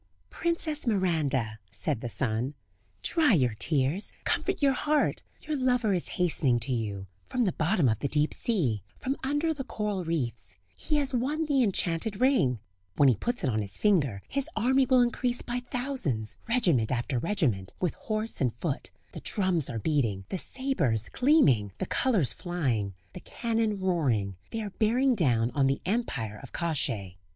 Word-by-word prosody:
"Princess 320 -4 -2
Miranda," 150 - 0
said 100 +3 -2
the 120 - -4
sun; 125 +3 -1 0.5
"dry 315 -8 +3
your 125 - +3
tears, 150 +5 +1
comfort - - 0
your 275 -2 +4
heart; 300 +3 +1 0.2
your 310 - -3
lover 250 -5 +2
is 180 - -1
hastening 150 -8 +2
to 130 +2 0
you, 105 -5 -3 0.2
from 250 -1 -1
the 190 - +2
bottom 160 -2 +2
of 110 -2 +1
the 140 - -1
deep 150 +1 +1
sea, 140 - 0
from 265 +1 -2
under 290 +4 +1
the 280 -3 -5
coral 210 -6 -3
reefs; 120 - -3 0.2
he 305 - -2
has 280 -2 +1
won 285 +6 0
the 285 -3 +2
enchanted 195 -1 0
ring; 245 - +3 0.4
when 140 - +6
he 125 - +4
puts 240 - -2
it 135 - +2
on 110 -1 0
his 100 -1 -4
finger, 140 - +2
his 275 +2 -2
army 260 +4 +3
will 255 -2 +5
increase 245 0 +1
by 245 +1 -2
thousands, 245 - -2
regiment 175 - +2
after 125 0 -1
regiment, 125 - 0
with 180 - 0
horse 215 +1 -3
and 125 -4 +1
foot; 145 +3 -3 0.2
the - - -8
drums 185 - +1
are 115 - -3
beating, 115 -8 0
the 190 - -2
sabres 165 - 0
gleaming, 140 - +3
the - - -2
colours 210 - +1
flying, 125 - -2 0.2
the - - -7
cannon 225 -3 -1
roaring, 135 - 0
they 225 - -3
are 205 - -5
bearing 245 +6 +2
down 125 - +2
on 135 -2 +2
the 135 - +1
empire 130 - -2
of 135 - -11
Kosciey. 115 - -2
175 Hz, 170 wpm, -28 LUFS, -, 0.5 s, when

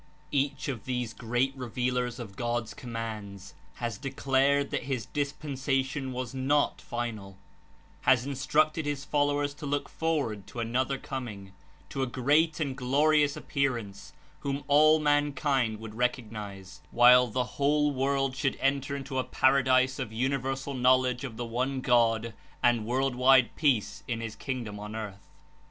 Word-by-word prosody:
Each 140 -1 0
of 125 -6 -4
these 125 -3 -2
great 125 +3 -1
revealers 125 -1 -2
of 110 -6 -8
God's 120 -2 -2
commands 110 -5 -6 0.2
has 115 -4 -4
declared 140 +1 +1
that - - -2
his 130 -4 -2
dispensation 140 -2 -2
was 125 -1 -4
not 135 +3 +1
final; 110 -5 -5 0.6
has 130 -1 +4
Instructed 150 +3 +1
his 145 -1 -3
followers 145 -1 +1
to 150 0 -7
look 145 0 -1
forward 140 -12 -2
to 120 - -8
another 130 +4 0
coming, 115 -9 -6 0.4
to 135 - -3
a 130 - +1
great 150 +6 +2
and 140 -4 -1
glorious 145 +3 +2
Appearance, 120 -8 -3 0.3
whom 140 -1 -2
No 140 - -6
all 155 +2 +6
mankind 145 -6 +1
would 110 -1 -8
recognize, 105 -5 -4
while 125 +1 +7
the 125 +3 -1
Dispensation 125 - -12
whole 145 +1 +2
world 135 0 0
should 135 +1 0
enter 140 0 0
into 135 -1 -3
a - - +1
para 135 +2 +3
^^"^^ 130 0 +5
disc 130 +2 -5
of 125 -5 -4
universal 135 +3 -2
knowledge 130 0 +3
of 120 -5 -6
the 120 - -3
One 130 +4 -1
God 115 -3 +2 0.3
and 120 -3 +3
world 130 +2 +1
wide 130 0 +4
peace 125 - +1
in 120 -3 -2
his 115 -1 -5
Kingdom 120 -6 -5
on 105 +1 -7
earth. 100 -3 -7
130 Hz, 155 wpm, -29 LUFS, 120-140 Hz, 0.6 s, while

